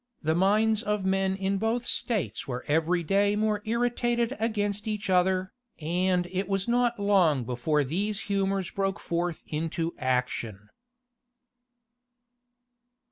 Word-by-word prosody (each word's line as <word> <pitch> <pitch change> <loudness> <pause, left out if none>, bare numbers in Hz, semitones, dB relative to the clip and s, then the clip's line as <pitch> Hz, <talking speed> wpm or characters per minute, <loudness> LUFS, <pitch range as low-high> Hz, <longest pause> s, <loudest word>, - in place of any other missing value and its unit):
The 160 +1 +2
minds 210 +5 +3
of 210 -4 -1
men 190 0 +1
in 195 0 -1
both 230 +3 0
states 220 -6 -2
were 125 -2 -4
every 165 +3 +1
day 200 +4 +2
more 210 0 0
irritated 240 +1 0
against 210 -2 -1
each 210 -3 -2
other; 185 +1 +2 0.3
and 180 +3 +1
it 190 0 -2
was 195 0 -1
not 240 -1 +1
long 185 -10 +3
before 125 +6 0
these 200 +9 -2
humors 195 -2 -1
broke 195 0 -1
forth 170 0 -2
into 165 +2 -2
action. 120 -5 -2
195 Hz, 125 wpm, -27 LUFS, 165-210 Hz, 0.3 s, minds